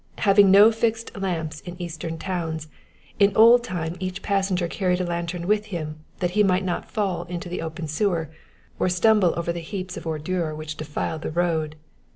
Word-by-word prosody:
Having 200 -1 +5
no 205 +4 +8
fixed 225 0 -1
lamps 165 -6 -3
in 175 0 -9
eastern 165 -1 -5
towns, 160 -3 -3 0.5
in 200 -1 +4
old 235 +2 +7
time 175 -6 -4
each 185 0 -4
passenger 190 -3 0
carried 180 0 0
a - - 0
lantern 170 0 -3
with 210 +2 +1
him 155 -6 -5 0.2
that 180 -1 +1
he 210 +3 +2
might 190 -1 +3
not 175 - -3
fall 190 -6 -1
into 175 0 -6
the 175 - -4
open 160 0 -5
sewer, 165 -1 -1 0.5
or - - +2
stumble 190 0 +4
over 170 0 -1
the 170 - -4
heaps 185 +2 -6
of - - -7
ordure 160 +1 -2
which 155 0 -6
defiled 155 +1 -4
the - - -3
road. 160 -2 0
175 Hz, 185 wpm, -24 LUFS, 160-195 Hz, 0.5 s, no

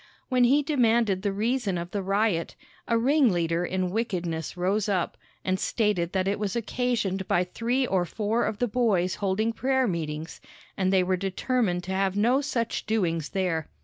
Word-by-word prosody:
When 250 -2 +4
he 280 +4 +4
demanded 235 - +2
the 200 0 0
reason 215 -1 0
of 170 +1 -5
the 205 - -2
riot, 195 -3 0 0.3
a 230 - +2
ringleader 210 - +2
in 185 0 -1
wickedness 175 -7 -2
rose 195 +4 0
up 185 -4 0 0.3
and 185 0 0
stated 205 -7 0
that 190 -1 0
it 200 +1 0
was 205 -1 -2
occasioned 230 -5 -1
by 175 - +2
three 235 +8 -1
or 190 -6 +1
four 215 +6 -1
of 210 - -2
the 245 - 0
boys 205 -6 +1
holding 210 +4 +1
prayer 265 +2 +1
meetings, 160 -3 -4 0.3
and 190 -1 +1
they 190 -1 +4
were 185 0 +1
determined 195 0 -1
to 185 - -5
have 195 0 0
no 245 +6 +3
such 235 -5 -2
doings 165 -8 0
there. 180 -5 -1
200 Hz, 175 wpm, -26 LUFS, 180-230 Hz, 0.3 s, When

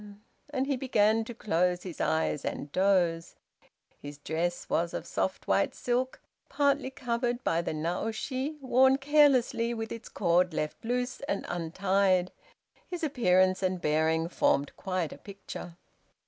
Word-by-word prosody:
and 270 -3 -1
he 280 0 0
began 225 -4 +2
to 230 - -8
close 180 -4 0
his 180 -4 -6
eyes 160 -2 0
and 145 - -4
doze. 180 -3 +1 0.7
His 145 0 -8
dress 165 +4 -2
was 170 +1 0
of - - -4
soft 190 - -2
white 200 - +2
silk, 250 +1 -1 0.3
partly 280 -1 +1
covered 245 -1 -2
by 165 - +1
the - - -3
naoshi, 225 - -3
worn 265 +1 +4
carelessly, 270 -5 +3
with 225 -1 -5
its 230 -1 -7
cord 175 0 +2
left 150 - -3
loose 245 +2 -2
and - - -1
untied. 185 +2 +1 0.6
His 355 -2 -5
appearance 185 -10 +3
and 185 -1 0
bearing 160 +1 +1
formed 145 -4 +1
quite 185 -5 -3
a - - -13
picture. 195 -4 -9
195 Hz, 140 wpm, -29 LUFS, 170-250 Hz, 0.7 s, worn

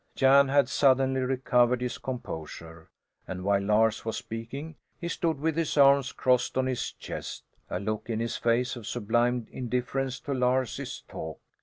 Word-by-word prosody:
Jan 140 +1 +6
had 140 -1 +3
suddenly 130 -1 +3
recovered 125 -1 +2
his 125 -1 -3
composure 80 - -7 0.4
and 90 -1 -5
while 100 0 +2
Lars 110 +2 +2
was 115 -1 -3
speaking, 135 +8 -6 0.2
he 170 - -4
stood 165 -3 -1
with 160 +1 0
his 165 -2 -1
arms 140 -1 +5
crossed 125 0 +1
on 130 - +2
his 130 -2 -2
chest - - -7 0.3
a - - -2
look 110 +3 -3
in 110 -1 -1
his 115 0 -2
face 120 +2 +1
of 115 -4 -9
sublime 120 +1 +1
indifference 125 +1 -2
to 140 - -3
Lars's 125 -2 -1
talk. 80 -1 -7
125 Hz, 160 wpm, -28 LUFS, 115-135 Hz, 0.4 s, Jan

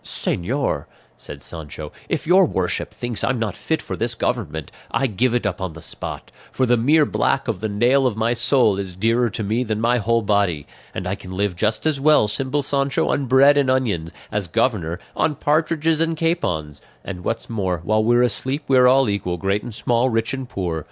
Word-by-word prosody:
"Señor," 90 - -1 0.3
said - - -10
Sancho, 80 -4 -6 0.2
"if - - -1
your 180 +2 +5
worship 95 -8 -1
thinks 120 -2 -4
I'm 130 - +1
not 110 -4 -2
fit 160 - -2
for - - -4
this 115 0 -1
government, 100 - -3 0.2
I 135 - 0
give 120 +1 +1
it 120 - 0
up 95 -2 -2
on 95 -3 -3
the 80 - -11
spot; - - -7 0.2
for 130 - +1
the 120 0 +3
mere 145 +6 +4
black 135 - 0
of 110 -6 -2
the 110 +2 -2
nail 125 +6 +3
of 110 -4 -3
my 115 +2 +1
soul 120 -4 +3
is 95 -3 -5
dearer 115 +5 +2
to 110 - -4
me 110 +5 0
than 110 -3 -2
my 120 +2 +2
whole 115 +1 +1
body; 100 -8 +1 0.3
and 90 - -4
I 90 - -1
can 100 -2 -9
live 100 0 -1
just 110 - -1
as 155 -3 +1
well, 150 -6 +4
simple 135 +6 -1
Sancho, 140 0 0
on 135 -1 0
bread 140 +3 +6
and 135 -2 +1
onions, 105 -12 0 0.2
as 105 -3 -1
governor, 95 -5 0 0.2
on 150 - +1
partridges 155 +2 +1
and 165 0 +1
capons; 90 - -1 0.2
and 90 -2 -6
what's 115 - -3
more, 95 -7 -2
while 110 +4 +2
we're 120 +2 +4
asleep 130 +5 -1
we're 130 -2 +5
all 135 0 +5
equal, 100 -4 -2
great 100 +3 0
and 115 -1 -8
small, 120 +3 +1
rich 115 +1 -1
and 130 -2 -5
poor. 85 -6 -3
115 Hz, 205 wpm, -21 LUFS, 100-135 Hz, 0.3 s, bread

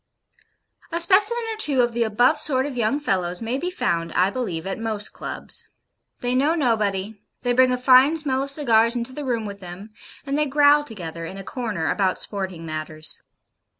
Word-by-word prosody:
A 335 - -1
specimen 410 +7 +4
or - - -8
two 285 -11 +4
of 240 - 0
the 235 - -2
above 245 +7 +3
sort 265 -3 +2
of 285 -3 -5
young 240 +4 0
fellows 180 -10 -1
may 235 +4 -3
be 355 - -2
found, 170 - -2
I 185 +2 +2
believe, 190 -10 -4
at 195 +2 -4
most 220 -2 -2
Clubs. - - -6 0.5
They 245 0 -1
know 285 +6 +2
nobody. 215 - -1 0.2
They 245 -1 +1
bring 255 +1 +4
a 250 - +1
fine 260 +5 +5
smell 270 -4 0
of 275 - -3
cigars 235 -5 +3
into 240 +2 -3
the 295 - -6
room 235 -4 -1
with 200 -1 -7
them, 185 +3 -10 0.3
and 280 +1 -1
they 300 - +2
growl 290 +1 +4
together, 170 - -7
in 190 - -8
a 195 - -7
corner, 210 -8 -3
about 190 -2 0
sporting 190 -5 -5
matters. 155 0 -5
235 Hz, 190 wpm, -23 LUFS, 195-275 Hz, 0.5 s, fine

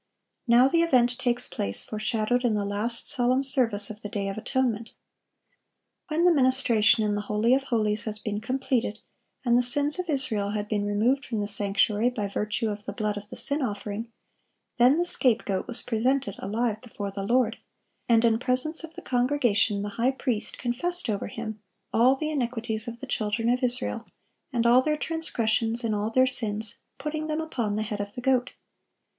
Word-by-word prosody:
Now 240 +2 +5
the 335 +4 +2
event 250 -7 +2
takes 245 -1 +1
place, 100 0 -1
foreshadowed 215 +3 -1
in 235 -3 +1
the 205 -1 -2
last 210 +4 -1
solemn 255 +2 +2
service 235 -7 +7
of 215 0 -12
the 210 - -7
day 200 -2 -3
of 195 - -5
atonement. 230 -1 -2 1.1
When 330 +1 0
the 355 - +5
ministration 255 -5 +3
in 210 -1 0
the 205 - -2
holy 210 +4 +1
of 270 - +2
holies 215 -4 -1
had 215 -1 -2
been 210 0 -3
completed, 255 -2 -2 0.5
and 240 -1 +3
the 245 - +4
sins 285 +6 +3
of 360 -2 -4
Israel 215 -8 -1
had 210 0 -3
been 205 -1 -2
removed 235 +7 +1
from 225 - -4
the 205 - -2
sanctuary 205 +3 +1
by 215 -5 -4
virtue 210 +3 -2
of 205 0 -8
the 200 - -5
blood 210 0 -2
of 205 0 -8
the - - -9
sin 285 +2 +1
offering, 210 -1 -5 0.7
then 250 +4 +4
the 350 - 0
scapegoat 225 - 0
was 240 0 -3
presented 250 0 -1
alive 215 +2 -2
before 205 -5 -7
the 195 0 -6
Lord; 235 +2 0 0.5
and 230 0 +4
in 225 -1 +2
presence 260 +6 +2
of 325 0 -9
the - - -10
congregation 245 -5 +1
the 205 - -4
high 255 +3 +2
priest 250 -5 -2
confessed 265 +5 0
over 200 - -3
him 220 0 -7 0.3
"all 250 +4 +4
the 310 +3 -4
iniquities 235 -5 -1
of 235 0 -8
the - - -6
children 225 -2 -2
of 250 +2 +1
Israel, 245 -2 -2 0.4
and 235 -3 -1
all 240 +2 +5
their 300 +2 -1
transgressions 235 -8 +2
in 225 -2 -1
all 210 +1 -2
their 255 +3 +3
sins, 220 -5 -1 0.2
putting 305 +2 -4
them 310 0 -2
upon 245 -10 -3
the 215 +1 -2
head 210 -1 -4
of 205 0 -6
the 245 - -6
goat." 250 -1 0
235 Hz, 190 wpm, -26 LUFS, 210-260 Hz, 1.1 s, service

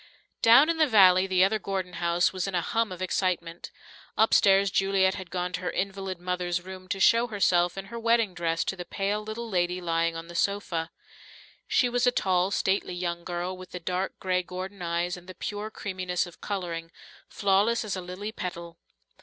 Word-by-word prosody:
Down 240 +6 +7
in 335 0 0
the 310 -1 +4
valley, 190 -5 +6
the 185 -1 +3
other 215 +3 +2
Gordon 190 -2 -4
house 170 +1 +2
was 185 0 -2
in 195 - -3
a 175 - +2
hum 225 +3 -1
of 185 0 -5
excitement. 175 -2 -2 0.5
Upstairs 200 -3 +4
Juliet 195 0 +2
had 185 -3 -7
gone 180 0 -3
to - - -3
her 180 - -2
invalid 195 -1 -3
mother's 180 -1 -2
room 185 +1 -10
to 195 +1 -3
show 230 +4 +5
herself 180 -5 +2
in 195 - -5
her 235 +3 -7
wedding 230 -3 +2
dress 165 -1 -1
to - - -3
the 180 - -6
pale 200 +3 -2
little 220 +2 -6
lady 180 -3 0
lying 165 -1 0
on 165 0 -6
the 175 - -10
sofa. 170 -2 -1 0.8
She 250 - +3
was 245 +1 +1
a - - +5
tall, 185 -5 +1
stately 190 -2 0
young 170 -1 -3
girl 175 +1 -3
with 185 0 -12
the 180 - -4
dark 180 +2 -3
grey 185 -1 0
Gordon 185 +2 -7
eyes 170 +1 -1
and 180 0 -14
the 185 - -9
pure 210 +1 -4
creaminess 185 -4 -3
of 175 - -14
colouring, 170 -5 -4 0.4
flawless 205 +4 +2
as 205 - -2
a 185 - -4
lily 185 +4 -6
petal. 170 -4 -7
185 Hz, 195 wpm, -27 LUFS, 175-200 Hz, 0.8 s, Down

